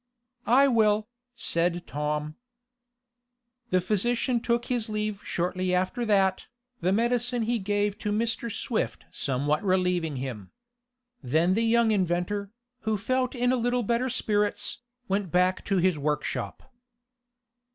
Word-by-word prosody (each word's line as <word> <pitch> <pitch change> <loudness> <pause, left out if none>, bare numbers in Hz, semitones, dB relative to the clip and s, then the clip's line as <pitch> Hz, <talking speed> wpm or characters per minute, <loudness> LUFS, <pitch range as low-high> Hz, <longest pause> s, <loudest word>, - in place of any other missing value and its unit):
"I 270 +4 +6
will," 215 -4 +3 0.3
said 175 -3 0
Tom. 150 +1 -3 1.3
The 185 - +3
physician 235 +6 +1
took 235 0 0
his 240 -3 -2
leave 215 -1 -2
shortly 180 +1 -1
after 185 +6 0
that, 195 -3 +2 0.3
the 180 +2 +1
medicine 240 +2 +1
he 235 +1 0
gave 205 +1 -1
to 210 - -2
Mr. 230 +2 -1
Swift 220 +2 -2
somewhat 145 +4 0
relieving 180 -5 +1
him. 125 -7 -5 0.7
Then 160 +8 +2
the 220 - +1
young 230 0 +3
inventor, 190 +1 0 0.3
who 220 -1 -1
felt 255 +5 -1
in 245 0 +2
a - - +3
little 245 0 0
better 235 +4 0
spirits, 210 -4 0 0.3
went 195 -3 -1
back 180 +1 +2
to 195 - +1
his 180 -3 +2
workshop. 150 - -3
205 Hz, 130 wpm, -27 LUFS, 180-235 Hz, 1.3 s, I